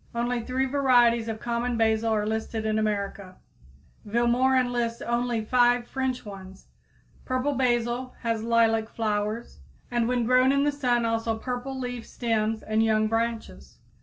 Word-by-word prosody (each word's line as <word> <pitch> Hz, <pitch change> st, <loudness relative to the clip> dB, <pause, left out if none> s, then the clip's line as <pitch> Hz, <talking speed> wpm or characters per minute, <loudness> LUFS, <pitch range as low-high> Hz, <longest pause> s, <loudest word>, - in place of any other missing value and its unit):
Only 240 Hz, +1 st, -1 dB
three 260 Hz, +2 st, -1 dB
varieties 245 Hz, -4 st, +3 dB
of 220 Hz, -1 st, -4 dB
common 240 Hz, +1 st, -2 dB
basil 225 Hz, 0 st, +2 dB
are 210 Hz, -1 st, +1 dB
listed 220 Hz, 0 st, -3 dB
in 215 Hz, 0 st, +1 dB
America; 200 Hz, -3 st, -3 dB, 0.7 s
Vilmorin 245 Hz, +3 st, +2 dB
lists 235 Hz, -1 st, -1 dB
only 235 Hz, -2 st, -1 dB
five 245 Hz, 0 st, +3 dB
French 260 Hz, -2 st, -3 dB
ones. 190 Hz, -2 st, -10 dB, 0.6 s
Purple 255 Hz, +3 st, -1 dB
basil 245 Hz, 0 st, 0 dB
has 230 Hz, -2 st, -1 dB
lilac 225 Hz, -1 st, +2 dB
flowers, 215 Hz, -, -3 dB, 0.3 s
and 240 Hz, -1 st, +1 dB
when 245 Hz, -1 st, +1 dB
grown 255 Hz, +2 st, +4 dB
in 280 Hz, 0 st, +2 dB
the 290 Hz, -, +2 dB
sun 245 Hz, -4 st, 0 dB
also 225 Hz, 0 st, -1 dB
purple 250 Hz, +3 st, -4 dB
leaf 245 Hz, -2 st, -5 dB
stems 225 Hz, -2 st, -1 dB
and 215 Hz, 0 st, 0 dB
young 215 Hz, -1 st, +2 dB
branches. 225 Hz, -, -3 dB
235 Hz, 145 wpm, -26 LUFS, 220-245 Hz, 0.7 s, grown